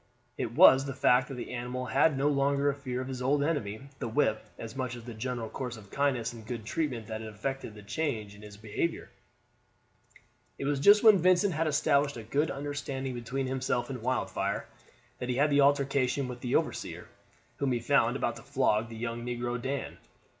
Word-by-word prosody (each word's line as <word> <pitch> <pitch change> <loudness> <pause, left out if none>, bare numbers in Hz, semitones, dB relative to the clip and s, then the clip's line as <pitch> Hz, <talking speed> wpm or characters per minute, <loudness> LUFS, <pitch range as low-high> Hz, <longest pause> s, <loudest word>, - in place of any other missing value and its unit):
It - - -3
was 135 0 +8
the 135 -2 -5
fact 125 0 +4
that 135 - -6
the 125 - -6
animal 125 +1 -4
had 140 +3 +3
no 140 +2 +2
longer 140 0 +2
a - - -5
fear 130 -3 -4
of 130 - -5
his 130 -1 -5
old 140 +3 +2
enemy 115 -10 -2 0.2
the 125 - -3
whip 110 -2 +1
as 115 0 -8
much 130 -2 -3
as 120 - -10
the 120 0 -8
general 120 +1 -3
course 125 0 -5
of 100 -3 -14
kindness 130 -5 0
and 115 -2 -10
good 115 -1 -6
treatment 125 -4 -2
that 110 +1 -5
had 110 - -6
effected 125 +1 -4
the 105 - -11
change 110 -4 -3
in 100 - -14
his 105 -1 -11
behavior. 110 +10 -3 1.5
It - - -4
was 140 -1 0
just 205 +8 +7
when 215 -4 +8
Vincent 185 +2 +4
had 160 +1 0
established 140 -2 +2
a 115 - -7
good 145 +8 0
under 145 +1 -4
standing 135 -2 -4
between 125 +3 -3
himself 130 0 -1
and 125 -3 -5
Wildfire 130 +2 -1 0.5
that 125 - -4
he 125 - 0
had 145 +3 +3
the 140 0 +5
altercation 140 -1 +2
with 125 -1 -7
the 125 - -1
overseer, - - -2 0.5
whom 140 -2 0
he 120 - +1
found 115 - +2
about - - -1
to - - -10
flog 110 +2 +1
the 115 - -8
young 115 +1 -4
negro 120 0 -3
Dan. 135 +2 -4
130 Hz, 205 wpm, -30 LUFS, 115-140 Hz, 1.5 s, was